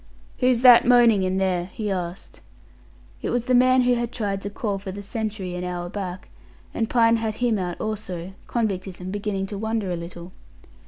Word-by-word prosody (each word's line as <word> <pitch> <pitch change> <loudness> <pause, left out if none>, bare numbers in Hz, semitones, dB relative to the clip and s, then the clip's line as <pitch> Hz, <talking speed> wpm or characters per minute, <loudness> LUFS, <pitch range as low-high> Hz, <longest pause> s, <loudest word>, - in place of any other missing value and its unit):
"Who's 250 -2 +3
that 245 -2 +8
moaning 240 -4 +6
in 185 0 0
there?" 185 -2 0
he 210 +2 -4
asked. 180 0 -5 0.8
It - - -2
was 245 -1 -1
the 255 - +1
man 255 +1 +5
who 250 0 +3
had 240 -1 -1
tried 200 -5 -2
to 200 - -4
call 200 -1 -3
for 195 -1 -6
the 200 +2 -7
sentry 210 -3 -4
an 180 0 -4
hour 175 -1 -4
back, 185 -2 -6 0.4
and 225 -1 -1
Pine 230 -1 +4
had 220 -1 -2
him 235 -4 +1
out 180 -2 -4
also; 190 -4 -5
convictism 190 -5 -3
beginning 205 -1 -2
to 195 0 -6
wonder 220 -3 -2
a - - -1
little. 170 +1 -8
205 Hz, 190 wpm, -24 LUFS, 185-230 Hz, 0.8 s, that